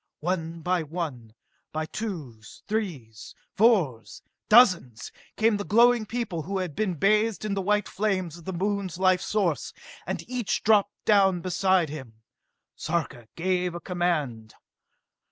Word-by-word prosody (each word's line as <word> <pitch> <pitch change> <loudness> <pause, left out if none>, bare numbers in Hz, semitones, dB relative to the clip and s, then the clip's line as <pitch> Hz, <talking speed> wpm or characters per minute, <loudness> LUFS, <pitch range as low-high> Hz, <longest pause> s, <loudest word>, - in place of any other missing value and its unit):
One 165 -1 -3
by 180 +1 0
one, 145 -9 -6 0.4
by 155 0 -2
twos, 155 - -7
threes, 150 - -4 0.2
fours, 160 - +2 0.3
dozens, 180 - +4 0.3
came 220 -1 +3
the 205 - -3
glowing 235 +1 +4
people 220 -8 -3
who 195 +5 -4
had 180 -6 -3
been 200 -5 -1
bathed 215 +5 +2
in 210 - -1
the 195 - -1
white 210 +1 +1
flames 185 -5 -2
of 165 - -16
the 190 - -3
Moon's 195 0 -2
life 185 -1 +3
source, 175 - -1 0.3
and - - -2
as - - -25
each 245 -4 -2
dropped 205 -2 +2
down 195 -4 +4
beside 185 -1 +1
him, 125 -7 -10 0.5
Sarka 150 -8 -3
gave 180 0 -1
a - - -4
command. 155 - -2
180 Hz, 140 wpm, -26 LUFS, 155-205 Hz, 0.5 s, dozens